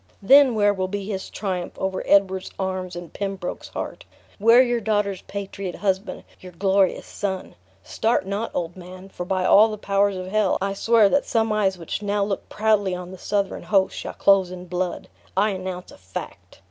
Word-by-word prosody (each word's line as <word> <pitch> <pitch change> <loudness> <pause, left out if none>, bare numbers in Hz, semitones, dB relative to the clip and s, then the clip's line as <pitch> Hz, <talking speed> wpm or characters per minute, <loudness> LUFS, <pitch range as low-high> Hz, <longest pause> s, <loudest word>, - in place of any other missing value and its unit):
Then 270 +3 +7
where 205 -1 +3
will 185 -1 -2
be 200 +1 -4
his 195 -2 -4
triumphs 185 -4 -4
over 190 0 -2
Edward's 190 -1 +3
arms 185 -1 -3
and 175 -2 -8
Pembroke's 195 -3 -4
heart? - - -6 0.4
Where 230 +4 +7
your 240 -2 0
daughter's 205 -3 0
patriot 195 -2 -6
husband; 195 -1 -2 0.2
you 185 - -10
glorious 190 +2 +1
son? 190 -2 -4 0.3
Start 225 -4 0
not, 200 +4 -2
old 175 0 -2
man, 185 +1 -11
for 180 -2 -7
by 185 -1 0
all 210 +4 +7
the 215 - -5
powers 200 -1 +1
of 185 - -5
hell 200 0 +1
I 195 +1 -1
swear 225 +1 +4
that 280 - +1
some 225 -2 +1
eyes 195 -3 +1
which 170 +3 -5
now 205 0 0
look 200 -1 -3
proudly 210 -3 +1
on 180 0 -7
the 190 - -10
Southron 200 -1 -1
host, 195 -2 +1
shall - - -6
close 195 -2 +4
in 180 0 -8
blood! 180 0 -3 0.3
I 210 +2 +3
announce 185 -1 -6
a - - -15
fact!" 95 0 -9
195 Hz, 185 wpm, -23 LUFS, 185-205 Hz, 0.4 s, Then